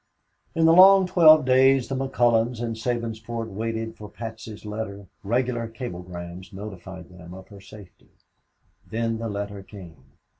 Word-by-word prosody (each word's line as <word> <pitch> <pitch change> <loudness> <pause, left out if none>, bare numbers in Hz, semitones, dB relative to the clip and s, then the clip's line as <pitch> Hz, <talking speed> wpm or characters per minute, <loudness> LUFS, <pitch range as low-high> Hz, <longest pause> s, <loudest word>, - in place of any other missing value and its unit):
In 165 0 +3
the 165 - +6
long 190 +2 +8
twelve 155 -5 +6
days 130 0 +4
the 135 - -3
McCullons 120 -3 +1
and 115 -1 -3
Sabinsport 115 -1 -4
waited 110 +2 -4
for 105 -2 -11
Patsy's 110 -1 -9
letter, 105 -2 -6 0.2
regular 120 +2 -1
cablegrams 90 -6 -8
notified 95 -3 -9
them 90 -1 -12
of 95 0 -13
her 100 -1 -13
safety. 100 -1 -15 0.8
Then 115 0 -2
the 115 0 -4
letter 100 -1 -5
came. 95 -5 -13
110 Hz, 140 wpm, -24 LUFS, 100-120 Hz, 0.8 s, long